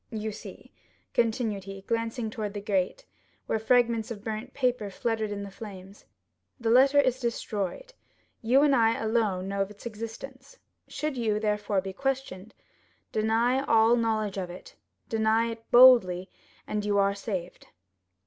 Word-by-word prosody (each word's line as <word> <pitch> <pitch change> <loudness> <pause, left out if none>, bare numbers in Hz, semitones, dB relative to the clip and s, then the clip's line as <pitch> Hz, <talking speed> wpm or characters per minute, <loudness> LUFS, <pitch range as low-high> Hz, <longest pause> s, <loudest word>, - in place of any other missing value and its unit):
"You 220 -2 -4
see," 210 - -11 0.4
continued 220 -4 0
he, 195 0 -8
glancing 230 +1 -2
toward 210 -2 -5
the - - -2
grate, 200 - -1 0.4
where 220 - -1
fragments 235 0 +2
of 210 -4 -7
burnt 220 +2 -5
paper 250 -6 -1
fluttered 220 +2 -2
in 200 0 -4
the 200 - -8
flames, 195 -1 -11 0.5
"the 230 -2 0
letter 270 +4 +6
is 260 -2 +2
destroyed; 235 - -3 0.5
you 255 +5 +4
and 285 -2 +4
I 230 -2 +3
alone 215 -5 0
know 200 0 -2
of 195 - -1
its 210 +2 -14
existence; 235 - -8 0.3
should 305 -3 -4
you, 215 -3 0
therefore, 210 -2 0
be 190 0 -6
questioned, 255 -5 -4 0.6
deny 230 +4 +1
all 225 +1 +5
knowledge 215 -4 -1
of 180 -2 -4
it—deny 220 +5 -2
it 225 0 -11
boldly, 230 -8 +6 0.3
and 210 -1 -3
you 205 -1 +1
are 200 0 +3
saved." 190 -3 -6
220 Hz, 150 wpm, -27 LUFS, 200-240 Hz, 0.6 s, letter